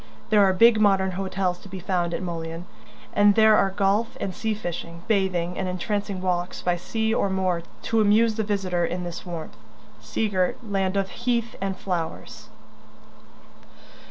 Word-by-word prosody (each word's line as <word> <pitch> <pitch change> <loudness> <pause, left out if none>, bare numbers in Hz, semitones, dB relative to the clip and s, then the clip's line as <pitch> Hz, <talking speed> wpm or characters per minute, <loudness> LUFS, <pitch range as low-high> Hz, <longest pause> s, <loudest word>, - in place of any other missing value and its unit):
There 210 -1 +6
are 190 - +5
big 220 +3 +5
modern 195 -2 +3
hotels 185 -1 -2
to 195 - -13
be 190 - -6
found 175 -1 -1
at - - -4
Mullion, 165 -1 -5 0.5
and 205 -1 +5
there 220 -1 +6
are 195 - +3
golf 200 +3 0
and 190 - -3
sea 220 +3 -2
fishing, 170 -3 -6
bathing, 185 -5 0
and 190 - -1
entrancing 200 +1 -2
walks 180 -1 -1
by 180 -1 +2
sea 220 +5 -1
or 200 - +1
moor 185 -2 0 0.2
to 225 -1 +2
amuse 215 +2 +4
the 220 0 -1
visitor 190 -4 -1
in 180 +1 -2
this 175 +1 -7
warm, 170 -3 -6 0.5
sea 220 - -1
girt 185 -3 0
land 195 -1 0
of 195 -1 -1
heath 235 -2 -1
and 195 -1 -2
flowers. 175 -4 -5
190 Hz, 165 wpm, -25 LUFS, 180-210 Hz, 0.5 s, There